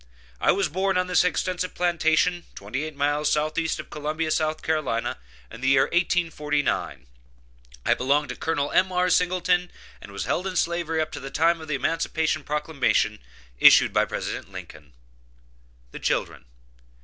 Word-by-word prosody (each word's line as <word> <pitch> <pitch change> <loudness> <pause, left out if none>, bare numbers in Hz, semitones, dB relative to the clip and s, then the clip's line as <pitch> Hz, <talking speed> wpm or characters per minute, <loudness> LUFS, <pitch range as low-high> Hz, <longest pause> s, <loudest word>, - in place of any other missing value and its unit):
I - - +4
was 200 -2 +1
born 190 +4 0
on 180 - +1
this 180 -1 +3
extensive 180 0 -1
plantation, 170 0 +1
twenty 115 +10 -4
eight 155 -1 -7
miles 145 +1 +1
southeast 155 +2 0
of - - -9
Columbia, 155 +2 -2
South 155 0 0
Carolina, 145 - -1 0.3
in 115 - -10
the 130 - -1
year 135 0 +5
1849. 150 - -1 0.8
I - - +4
belonged 140 +3 +1
to - - -4
Col. 145 -3 -1
M.R. 180 -1 +2
Singleton, 180 0 +2 0.3
and - - -11
was 100 - -4
held 185 - -1
in 185 - -5
slavery 170 -2 0
up 155 - -3
to - - -6
the 135 - -7
time 165 +4 +2
of 160 - -9
the 150 - -1
emancipation 160 +1 -1
proclamation 145 -8 0 0.4
issued - - +7
by - - +3
President - - -5
Lincoln. 75 -4 -11 1.0
THE - - -8
CHILDREN. - - -2
155 Hz, 155 wpm, -25 LUFS, 145-175 Hz, 1.0 s, issued